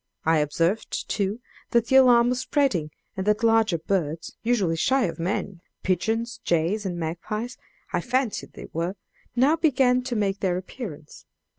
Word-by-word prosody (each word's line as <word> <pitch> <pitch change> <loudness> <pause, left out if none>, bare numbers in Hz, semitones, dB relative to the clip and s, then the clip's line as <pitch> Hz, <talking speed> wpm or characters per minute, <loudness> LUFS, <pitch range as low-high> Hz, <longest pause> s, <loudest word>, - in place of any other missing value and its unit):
I 160 0 +4
observed, 165 +8 -1
too, 205 +3 -1 0.3
that 235 -1 +3
the 265 - +1
alarm 245 -2 +6
was 250 0 0
spreading, 260 - +1 0.3
and 190 +1 -3
that 210 +2 +2
larger 225 -5 +4
birds, 165 -2 -2
usually 210 -8 +1
shy 265 +10 +2
of 170 - -2
men 180 0 -2 0.2
pigeons, 225 +6 -1
jays, 175 +5 +1
and 175 -2 -3
magpies, 180 +9 -4 0.4
I - - +1
fancied 250 -3 -1
they - - -9
were 170 +4 -2 0.4
now 275 +6 +4
began 260 -5 +3
to 245 - -2
make 200 -2 0
their 180 -2 0
appearance. 185 - -8
210 Hz, 155 wpm, -25 LUFS, 170-245 Hz, 0.4 s, alarm